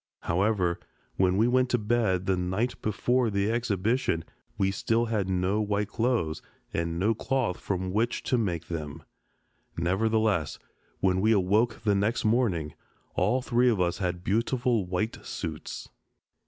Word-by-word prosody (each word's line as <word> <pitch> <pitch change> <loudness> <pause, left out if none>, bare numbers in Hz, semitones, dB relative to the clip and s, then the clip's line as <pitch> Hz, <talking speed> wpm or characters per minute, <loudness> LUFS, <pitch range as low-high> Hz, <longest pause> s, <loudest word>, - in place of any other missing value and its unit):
However, 90 -1 +1 0.4
when 95 0 +3
we 110 +3 +4
went 130 0 +3
to 125 - +2
bed 105 -5 +1
the 95 - +2
night 95 +7 -1
before 120 +3 +1
the 100 +1 0
exhibition 110 -5 0 0.3
we 95 -1 +2
still 115 +4 +1
had 105 -5 -1
no 95 +3 +1
white 105 -1 -1
clothes 110 -10 0 0.3
and 85 0 -1
no 105 +6 +2
cloth 120 -4 -1
from 95 -1 -2
which 115 +3 0
to - - +1
make 90 -9 -1
them. 75 -4 -5 0.7
Nevertheless, 100 -1 +1 0.4
when 95 0 +2
we 110 +2 +4
awoke 105 +4 +2
the 105 -2 +3
next 105 +5 0
morning, 105 - +1 0.4
all 120 +8 +1
three 125 -1 +3
of 110 -5 +1
us 90 +1 0
had 90 -2 -2
beautiful 115 0 +1
white 95 +5 -2
suits. - - -6
105 Hz, 145 wpm, -28 LUFS, 90-115 Hz, 0.7 s, we